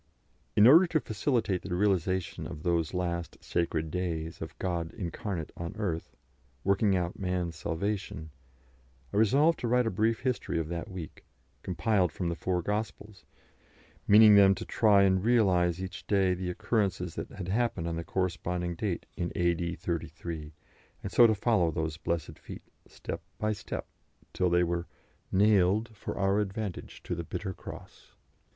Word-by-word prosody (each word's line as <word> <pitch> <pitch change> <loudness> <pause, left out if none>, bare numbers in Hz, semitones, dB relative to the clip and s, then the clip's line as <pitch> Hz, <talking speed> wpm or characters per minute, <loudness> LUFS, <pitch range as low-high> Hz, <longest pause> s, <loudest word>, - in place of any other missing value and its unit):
In 105 - +7
order 165 +9 +8
to 165 -2 +1
facilitate 110 -5 -1
the 90 -2 -4
realisation 95 -2 0
of 75 - -8
those 85 -1 0
last 85 -2 -2
sacred 80 -2 -1
days 85 -2 -3
of 80 - -7
God 85 -3 -2
incarnate 90 -3 -4
on 85 +3 -6
earth, 90 -7 -3 0.5
working 100 0 +3
out 90 -1 -2
man's 90 -3 -2
salvation, 85 -1 -3 0.8
I - - 0
resolved 140 +10 +4
to 120 - -2
write 125 +1 +3
a 115 - 0
brief 110 +4 +1
history 130 -9 -1
of 80 -1 -2
that 85 -1 -4
week, 90 -4 -8 0.4
compiled 90 +1 +1
from 90 -3 -3
the 85 - -2
Four 90 0 -1
Gospels, 105 0 -4 0.8
meaning 105 +1 +8
them 100 -1 +7
to - - -6
try 105 -3 +4
and 95 -1 +3
realise 95 -7 +3
each 95 +1 -7
day 95 -3 +3
the 90 0 -3
occurrences 95 -3 -1
that - - -5
had 90 -3 -6
happened 115 -5 0
on 85 - -2
the 85 - -3
corresponding 90 -1 -2
date 90 +1 -3
in 85 - -3
A.D. 85 -1 0
33, 80 -2 -5 0.5
and 100 - -4
so 120 - +7
to 110 - +2
follow 105 -5 +2
those 80 0 -3
"blessed 85 -1 -3
feet" - - -10 0.2
step - - -6 0.2
by 110 0 0
step, 100 - -6 0.5
till 90 -1 +1
they 90 0 +3
were 85 0 -2 0.3
"... - - -40
nailed 105 +2 +3
for - - -6
our 100 +1 +2
advantage 105 -1 -4
to - - -3
the 85 0 -3
bitter 95 +3 -4
cross." - - -11
95 Hz, 160 wpm, -29 LUFS, 85-105 Hz, 0.8 s, order